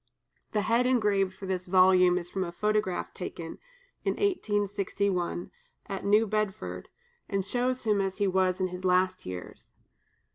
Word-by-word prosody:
The 210 Hz, -, +2 dB
head 235 Hz, +4 st, +2 dB
engraved 205 Hz, -6 st, +2 dB
for 195 Hz, -, -8 dB
this 185 Hz, -1 st, -3 dB
volume 185 Hz, -1 st, +5 dB
is 175 Hz, -1 st, -4 dB
from 190 Hz, -, -1 dB
a 170 Hz, -, -4 dB
photograph 210 Hz, 0 st, -1 dB
taken, 170 Hz, -2 st, -7 dB, 0.4 s
in -, -, +1 dB
1861, 200 Hz, -, -1 dB, 0.3 s
at 195 Hz, -3 st, -5 dB
New 210 Hz, +2 st, +4 dB
Bedford, 215 Hz, -1 st, -3 dB, 0.4 s
and 195 Hz, -2 st, -1 dB
shows 250 Hz, +4 st, 0 dB
him 210 Hz, -3 st, +2 dB
as 190 Hz, -1 st, -2 dB
he 205 Hz, -, +1 dB
was 185 Hz, -1 st, +2 dB
in 185 Hz, -1 st, 0 dB
his 180 Hz, +1 st, -7 dB
last 185 Hz, 0 st, +2 dB
years. 90 Hz, -1 st, -8 dB
195 Hz, 150 wpm, -29 LUFS, 185-210 Hz, 0.4 s, volume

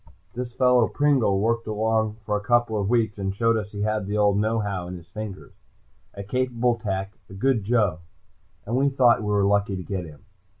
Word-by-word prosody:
This 125 Hz, 0 st, -5 dB
fellow 125 Hz, -3 st, +4 dB
Pringle 130 Hz, -9 st, +2 dB
worked 115 Hz, +2 st, 0 dB
along 110 Hz, 0 st, 0 dB
for 105 Hz, -, 0 dB
a 105 Hz, -, -1 dB
couple 115 Hz, -1 st, +1 dB
weeks 110 Hz, -1 st, 0 dB
and 95 Hz, 0 st, -2 dB
showed 115 Hz, +2 st, +2 dB
us 105 Hz, -2 st, -3 dB
he 100 Hz, -, -6 dB
had 105 Hz, -2 st, -1 dB
the 105 Hz, +1 st, -2 dB
old 105 Hz, -1 st, +3 dB
know 110 Hz, +2 st, +1 dB
how 100 Hz, -5 st, -3 dB
in 90 Hz, -, -6 dB
his 85 Hz, -2 st, -11 dB
fingers. 100 Hz, +2 st, -8 dB, 0.6 s
A 100 Hz, -, -6 dB
capable 125 Hz, +1 st, 0 dB
tech, 95 Hz, -2 st, -4 dB
a 95 Hz, -, -10 dB
good 115 Hz, +1 st, +1 dB
joe, 105 Hz, -6 st, +1 dB, 0.7 s
and 115 Hz, -, -2 dB
we 140 Hz, +2 st, +3 dB
thought 125 Hz, -4 st, +4 dB
we 105 Hz, -, -4 dB
were 100 Hz, -1 st, +2 dB
lucky 100 Hz, 0 st, +1 dB
to 90 Hz, -, -5 dB
get 95 Hz, -2 st, -4 dB
him. 80 Hz, +5 st, -14 dB
105 Hz, 205 wpm, -24 LUFS, 100-115 Hz, 0.7 s, fellow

